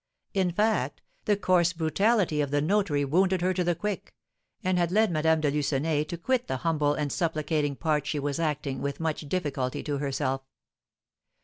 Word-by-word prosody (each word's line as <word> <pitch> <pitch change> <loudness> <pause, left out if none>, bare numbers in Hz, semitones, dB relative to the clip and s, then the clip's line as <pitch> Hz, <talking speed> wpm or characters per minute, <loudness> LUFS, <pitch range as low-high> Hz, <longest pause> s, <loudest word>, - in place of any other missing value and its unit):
In 190 -2 +2
fact, 210 +5 0 0.2
the 205 - +2
coarse 175 -3 +3
brutality 170 +1 +2
of 145 - -1
the 145 +1 +1
notary 155 -3 +1
wounded 185 +5 +2
her 185 +1 +2
to 180 - 0
the 175 0 +1
quick, 205 +4 -4 0.5
and 185 -1 +1
had 170 -1 +1
led 215 0 +3
Madame 160 0 +2
de 145 -2 +2
Lucenay 150 +1 0
to 170 - -5
quit 250 +7 0
the 130 - -1
humble 150 -3 +2
and 145 -2 -2
supplicating 155 -3 0
part 150 -1 0
she 150 - -1
was 145 +1 -2
acting 145 -4 -2
with 140 0 -3
much 160 -2 -3
difficulty 140 -8 -2
to 145 -2 -2
herself. 135 -1 -1
160 Hz, 180 wpm, -27 LUFS, 145-180 Hz, 0.5 s, coarse